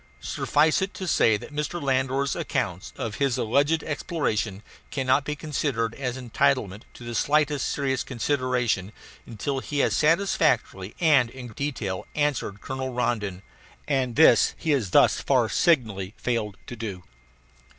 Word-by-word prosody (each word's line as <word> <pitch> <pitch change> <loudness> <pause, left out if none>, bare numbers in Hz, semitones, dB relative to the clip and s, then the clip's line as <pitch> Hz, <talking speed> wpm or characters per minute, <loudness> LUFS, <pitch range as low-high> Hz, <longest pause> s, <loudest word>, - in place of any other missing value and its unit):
Suffice 150 - +1
it 190 +1 -3
to 190 - -5
say 110 -9 +4
that 150 - -11
Mr. 150 +4 -3
Landor's 135 0 0
accounts 95 -4 -3
of 110 -3 -4
his 135 -4 +2
alleged 145 +7 +2
exploration 110 - -2 0.3
cannot 135 +1 +1
be 150 - -2
considered 140 -7 -2
as 130 -1 -4
entitled 125 -5 0
to - - -11
the 120 0 -6
slightest 150 +2 +1
serious 135 -3 -1
consideration 125 -5 -1 0.3
until 130 +5 -3
he 145 +2 -5
has - - +2
satisfactorily 155 - +1
and 145 -8 +4
in 125 0 -9
detail 110 -7 -4
answered 140 -9 -1
Colonel 130 0 -4
Rondon; 105 -6 -2 0.4
and 130 -5 0
this 160 - +5
he 160 - -1
has 130 -10 +1
thus - - +4
far - - +2
signally 110 - +1
failed 110 -5 -2
to 120 - -7
do. 100 -6 -6
130 Hz, 140 wpm, -25 LUFS, 110-145 Hz, 0.4 s, this